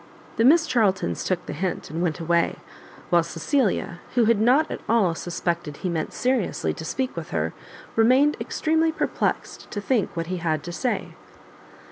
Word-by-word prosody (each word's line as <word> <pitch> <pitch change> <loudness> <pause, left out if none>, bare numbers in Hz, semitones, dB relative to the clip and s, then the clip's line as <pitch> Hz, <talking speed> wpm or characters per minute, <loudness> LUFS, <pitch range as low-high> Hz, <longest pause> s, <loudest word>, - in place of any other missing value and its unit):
The 225 - +3
Miss 320 +4 +6
Charltons 215 -10 +1
took 180 -2 -1
the - - -5
hint, 180 +1 -3
and 165 +2 -3
went 175 -2 -1
away; 170 0 +1 0.6
while 175 -1 +6
Cecilia, 175 - -1 0.2
who 240 -2 +4
had 220 -1 +3
not 265 +8 +4
at - - -5
all 215 -7 +3
suspected 170 -2 -3
he 185 - -3
meant 165 -2 -2
seriously 250 -5 0
to - - -8
speak 260 +10 -2
with 165 -2 -6
her, 80 0 -1 0.4
remained 260 +6 +4
extremely 320 +1 +1
perplexed 315 - -2
to 205 - -4
think 205 -4 0
what 165 - -1
he 185 +2 -3
had 160 -3 -1
to 175 - -6
say. 245 +8 -2
190 Hz, 170 wpm, -24 LUFS, 170-255 Hz, 0.6 s, Miss